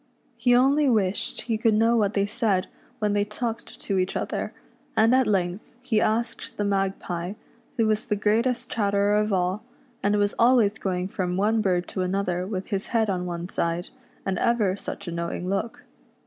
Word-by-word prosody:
He 245 +1 +3
only 275 +3 +4
wished 205 -5 0
he 225 -2 -2
could 220 -1 +3
know 225 +2 +4
what 210 -2 +1
they 200 -1 +2
said 205 -2 0 0.3
when 210 -3 0
they 205 0 +2
talked 225 +2 -5
to 195 -2 0
each 185 0 0
other; - - -3 0.5
and 225 +3 +5
at 260 -2 +4
length 185 -1 -1
he 245 -4 +1
asked 230 +2 -1
the 205 - 0
Magpie, 195 -2 -1 0.4
who 225 - +3
was 215 0 +1
the 210 - -1
greatest 230 +4 +1
chatterer 200 -1 +2
of 210 0 +1
all, 185 +2 0 0.4
and 205 +1 +2
was 205 0 +2
always 230 -3 +4
going 185 -1 -1
from 180 -2 -2
one 215 +3 +2
bird 180 -3 +1
to 190 - -3
another 185 -1 -1
with 190 -2 -4
his 195 -2 -2
head 220 -3 +1
on 180 -1 -2
one 170 0 -4
side, 170 -1 -2 0.4
and 190 -2 -1
ever 215 -6 +2
such 200 - -7
a - - -3
knowing 170 +1 -3
look. 200 +4 -2
205 Hz, 185 wpm, -25 LUFS, 185-225 Hz, 0.5 s, and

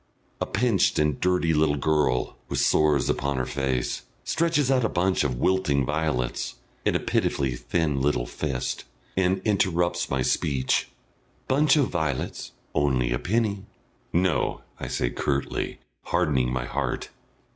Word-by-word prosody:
A - - 0
pinched 110 -3 +2
and 75 -2 +1
dirty 90 -2 +2
little 75 -1 +3
girl, 75 -4 +1
with - - -2
sores 75 -4 +3
upon 70 0 0
her 65 - 0
face, 65 -3 -1 0.2
stretches 160 -4 +1
out 130 -2 +3
a 110 - +2
bunch 95 0 +1
of 65 -4 0
wilting 70 -4 +2
violets, 75 -5 -1 0.3
in - - +1
a - - +3
pitifully 65 -3 0
thin 70 +3 -1
little 70 -3 +1
fist, 65 -1 -3 0.3
and 95 0 +1
interrupts 90 -5 +1
my 65 -1 0
speech. 65 0 +1 0.6
"Bunch 145 +3 +4
o' 145 - +4
vi'lets 80 - -2 0.2
on'y 65 -4 +1
a - - 0
penny." 105 -1 0 0.5
"No!" 90 -1 +1 0.2
I - - -4
say - - -1
curtly, 70 -1 -2 0.3
hardening 75 -8 +1
my 65 -1 -2
heart. - - -2
75 Hz, 140 wpm, -26 LUFS, 65-95 Hz, 0.6 s, Bunch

